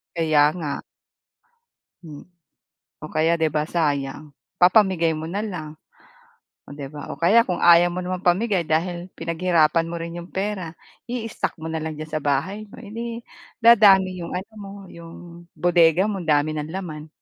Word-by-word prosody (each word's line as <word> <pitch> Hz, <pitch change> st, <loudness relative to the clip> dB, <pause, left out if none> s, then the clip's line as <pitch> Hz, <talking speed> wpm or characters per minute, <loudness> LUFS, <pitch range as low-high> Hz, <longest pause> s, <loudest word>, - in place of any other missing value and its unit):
Kaya 155 Hz, -3 st, +3 dB
nga. 155 Hz, -5 st, -4 dB, 1.2 s
Hmm 150 Hz, -3 st, -10 dB, 0.8 s
o 155 Hz, -, -7 dB
kaya 160 Hz, +2 st, +2 dB
'di 160 Hz, -2 st, 0 dB
ba 150 Hz, +1 st, -1 dB
sayang, 145 Hz, -3 st, -2 dB, 0.3 s
papamigay 180 Hz, -3 st, +4 dB
mo 155 Hz, 0 st, -4 dB
na 195 Hz, +5 st, -3 dB
lang. 155 Hz, -8 st, -6 dB, 0.9 s
Oh 145 Hz, -, -9 dB
'di 140 Hz, -2 st, -6 dB
ba 145 Hz, -1 st, -8 dB
o -, -, -5 dB
kaya 200 Hz, +8 st, +5 dB
kung 180 Hz, -, -1 dB
ayaw 170 Hz, 0 st, +7 dB
mo 180 Hz, -, -5 dB
namang 185 Hz, 0 st, -3 dB
pamigay 190 Hz, +1 st, +2 dB
dahil 175 Hz, +2 st, -1 dB
pinaghirapan 165 Hz, -1 st, +1 dB
mo 170 Hz, -, -5 dB
rin 165 Hz, 0 st, -6 dB
'yong 175 Hz, -, -9 dB
pera, 190 Hz, -4 st, -4 dB, 0.3 s
i-stock 230 Hz, -2 st, -3 dB
mo 160 Hz, -, -7 dB
na 160 Hz, -, -2 dB
lang 160 Hz, -1 st, -4 dB
diyan 155 Hz, 0 st, -8 dB
sa 155 Hz, -, -1 dB
bahay 155 Hz, +10 st, -1 dB
mo, -, -, -14 dB
eh 210 Hz, -4 st, -11 dB
dim 235 Hz, 0 st, -5 dB, 0.4 s
dadami 205 Hz, -5 st, +7 dB
iyong 170 Hz, -, -6 dB
ano 190 Hz, +5 st, -5 dB
mo, 195 Hz, -, -9 dB, 0.2 s
'yong 170 Hz, 0 st, -11 dB, 0.4 s
bodega 175 Hz, 0 st, +4 dB
mo 200 Hz, -3 st, -3 dB
ang 165 Hz, -, -9 dB
dami 145 Hz, +1 st, +3 dB
ng 150 Hz, 0 st, -4 dB
laman. 155 Hz, -5 st, -6 dB
170 Hz, 170 wpm, -23 LUFS, 155-190 Hz, 1.2 s, ayaw